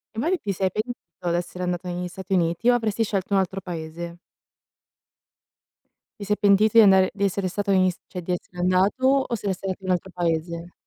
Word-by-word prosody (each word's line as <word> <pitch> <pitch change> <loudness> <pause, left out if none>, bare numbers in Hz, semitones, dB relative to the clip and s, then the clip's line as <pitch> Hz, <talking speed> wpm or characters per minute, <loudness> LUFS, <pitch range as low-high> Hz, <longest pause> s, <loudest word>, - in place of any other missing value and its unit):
Infatti 330 +12 +1
ti 205 - -3
sei 190 0 0
pentito 215 -4 -5
d'essere 175 +1 -3
andato 180 0 -2
negli 180 0 -3
Stati 190 +1 -6
Uniti 170 +5 +2
o 245 - +5
avresti 225 -2 0
scelto 200 -2 -2
un 195 - +5
altro 190 +1 -2
paese? 170 -1 -6 2.0
Ti 200 - -6
sei 210 +1 0
pentito 210 +2 +4
di 225 - +10
andare 190 -2 +6
di 200 - -4
essere 195 -1 0
stato 200 +2 -2
negli 185 -1 +4
St 180 - -8
cioè 180 - -6
di 180 +1 -2
essere 180 0 -7
andato 185 +8 +2 0.2
o 235 - -1
saresti 195 -2 -4
andato 190 0 -4
in 185 - -5
un - - +4
altro 190 +2 -7
paese? 170 0 -2
185 Hz, 200 wpm, -24 LUFS, 175-200 Hz, 2.0 s, di